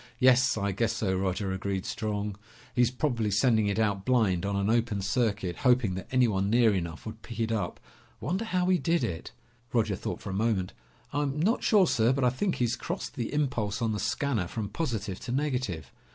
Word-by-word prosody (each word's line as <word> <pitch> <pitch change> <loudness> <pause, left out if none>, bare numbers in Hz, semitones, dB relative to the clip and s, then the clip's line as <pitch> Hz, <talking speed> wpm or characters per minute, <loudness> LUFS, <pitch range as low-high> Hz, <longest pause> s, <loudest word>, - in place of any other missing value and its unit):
"Yes, 130 -1 +5
I 100 -1 0
guess 115 +4 0
so, 100 -4 0
Roger," 95 +1 -1
agreed 95 0 -2
Strong. 105 -2 -3 0.4
"He's 120 -2 +3
probably 125 -4 -1
sending 110 +1 +3
it 100 - 0
out 100 -3 +1
blind, 100 -7 +2
on 100 - -1
an 100 0 0
open 110 -3 +1
circuit, 100 -5 0
hoping 125 -6 +3
that 95 +1 -6
anyone 110 -7 +2
near 115 -1 +4
enough 85 -4 -4
would 110 0 -7
pick 115 - -9
it 115 0 0
up. 100 -6 -2 0.4
Wonder 180 - -2
how 185 -5 0
he 185 -1 +4
did 165 +4 +1
it?" 80 -2 -4 0.4
Roger 115 -3 +1
thought - - -5
a - - -3
moment. 100 -3 0 0.4
"I'm 145 0 -1
not 210 +9 +2
sure, 205 -4 +5
sir, 120 -5 +3
but 135 0 -1
I 125 - +4
think 185 +8 -1
he's 120 -1 0
crossed 175 +8 -5
the 120 -5 -3
impulse 125 -8 -1
on 115 -2 0
the 105 - -2
scanner 110 -1 0
from 105 +2 -4
positive 110 - -3
to - - -6
negative." 125 - -2
110 Hz, 195 wpm, -28 LUFS, 100-130 Hz, 0.4 s, Yes